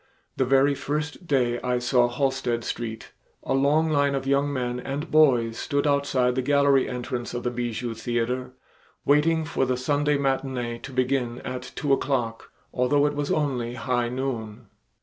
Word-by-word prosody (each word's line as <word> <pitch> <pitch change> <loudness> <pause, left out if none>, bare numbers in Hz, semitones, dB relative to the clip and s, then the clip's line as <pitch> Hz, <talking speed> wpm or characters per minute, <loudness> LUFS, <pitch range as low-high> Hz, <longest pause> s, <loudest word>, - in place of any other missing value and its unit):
The 130 - +1
very 135 +2 +4
first 150 +5 -4
day 125 -4 +1
I 125 0 0
saw 125 0 +3
Halsted 125 -2 -1
Street 115 -1 -5 0.3
a 135 - -1
long 150 +4 +3
line 145 -1 +2
of 135 -1 -3
young 140 +1 +2
men 125 -2 -2
and 140 +5 -5
boys 125 -7 +4
stood 145 -1 -1
outside 140 -3 +2
the 130 - 0
gallery 140 0 +3
entrance 125 -1 -4
of 120 - -3
the 125 - -1
Bijou 120 -1 -3
Theater, 125 +2 -2 0.5
waiting 160 +3 +3
for 140 - -1
the 130 -1 0
Sunday 145 +3 +1
matinee 130 -3 -1
to 135 - -9
begin 130 -2 0
at 125 0 -6
two 145 -2 +1
o'clock, 125 -5 -1 0.2
although 135 +3 +2
it 145 - +1
was 145 0 -2
only 125 -6 -1
high 120 -1 -1
noon. 120 -4 -4
130 Hz, 165 wpm, -25 LUFS, 120-140 Hz, 0.5 s, very